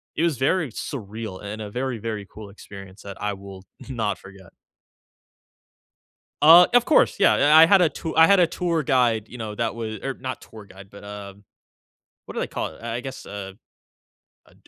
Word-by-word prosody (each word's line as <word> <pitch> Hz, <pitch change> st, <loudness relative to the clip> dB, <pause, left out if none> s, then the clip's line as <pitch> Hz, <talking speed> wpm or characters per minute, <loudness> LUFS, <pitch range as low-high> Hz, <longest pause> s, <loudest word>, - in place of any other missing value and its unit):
it 165 Hz, -, -1 dB
was 160 Hz, -7 st, +1 dB
very 150 Hz, 0 st, 0 dB
surreal 110 Hz, -6 st, -7 dB
and 105 Hz, +2 st, -6 dB
a 105 Hz, -, -6 dB
very, 125 Hz, +2 st, -3 dB
very 110 Hz, -2 st, -5 dB
cool 105 Hz, -1 st, -10 dB
experience 100 Hz, -1 st, -13 dB
that 100 Hz, 0 st, -10 dB
I 105 Hz, 0 st, -1 dB
will 95 Hz, -1 st, -11 dB, 0.3 s
not 110 Hz, -5 st, -2 dB
forget. 95 Hz, -2 st, -15 dB, 1.9 s
Uh, 170 Hz, +3 st, +9 dB
of 245 Hz, 0 st, +4 dB
course, 310 Hz, -, +3 dB
yeah, -, -, +5 dB
I 155 Hz, +2 st, +6 dB
I -, -, +8 dB
had 190 Hz, +1 st, +5 dB
a 170 Hz, -, +4 dB
to 160 Hz, -, -6 dB
I 160 Hz, 0 st, +7 dB
had 200 Hz, -2 st, +5 dB
a 175 Hz, -, +5 dB
tour 170 Hz, -2 st, -2 dB
guide, 120 Hz, -5 st, +1 dB
you 125 Hz, -, -10 dB
know, 110 Hz, -2 st, -6 dB
that 115 Hz, +1 st, -2 dB
wa 115 Hz, -1 st, -5 dB, 0.2 s
or 135 Hz, -1 st, -3 dB
not 130 Hz, -1 st, -6 dB
tour 110 Hz, -2 st, -13 dB
guide, 100 Hz, 0 st, -15 dB
but, 100 Hz, -, -13 dB
um- 100 Hz, -1 st, -10 dB, 0.8 s
what -, -, -10 dB
do -, -, -2 dB
they -, -, -2 dB
call -, -, -4 dB
it- -, -, -14 dB
I 115 Hz, 0 st, -4 dB
I -, -, -2 dB
guess 135 Hz, +1 st, -8 dB
a 95 Hz, -1 st, -8 dB, 0.9 s
a -, -, -23 dB
115 Hz, 200 wpm, -23 LUFS, 100-145 Hz, 1.9 s, Uh